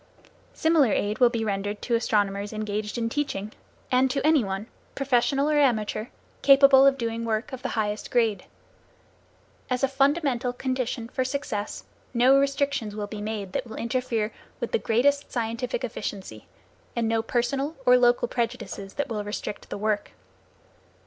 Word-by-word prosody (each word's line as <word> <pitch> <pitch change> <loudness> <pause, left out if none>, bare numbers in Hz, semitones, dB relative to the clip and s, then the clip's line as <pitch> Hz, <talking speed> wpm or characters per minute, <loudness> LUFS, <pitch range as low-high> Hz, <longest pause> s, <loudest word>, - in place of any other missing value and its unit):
Similar 320 -7 +3
aid 205 +1 -1
will 245 -2 +6
be 230 -2 -2
rendered 205 0 -2
to 240 - -2
astronomers 205 -3 +1
engaged 215 0 -3
in 230 -1 0
teaching, 230 -6 -3 0.4
and 260 +1 +4
to 275 +2 -1
any 310 -4 +5
one, 195 +1 -3 0.3
professional 275 +1 +2
or 300 -1 +3
amateur, 220 -5 +1 0.3
capable 275 -1 +7
of 275 0 +3
doing 230 -2 -3
work 225 +2 -2
of 260 - -6
the 265 - -3
highest 210 -1 -2
grade. 225 -6 +1 1.2
As 250 +1 -1
a - - +5
fundamental 275 -2 +1
condition 255 -2 -2
for 260 +2 -1
success, 255 -6 -3 0.3
no 250 +3 +6
restrictions 275 -6 0
will 210 -1 -3
be 205 0 -7
made 205 -3 -4
that - - -2
will 220 - -8
interfere 235 -3 -1 0.3
with - - -3
the 465 - +2
greatest 280 +5 +1
scientific 235 +2 -2
efficiency, 195 - -6 0.5
and 230 -1 0
no 225 0 +1
personal 270 +6 -1
or - - +7
local - - +4
prejudices 230 - -4
that 285 - -1
will 215 -4 -3
restrict 205 0 -6
the - - -4
work. 210 0 -1
235 Hz, 155 wpm, -26 LUFS, 215-275 Hz, 1.2 s, capable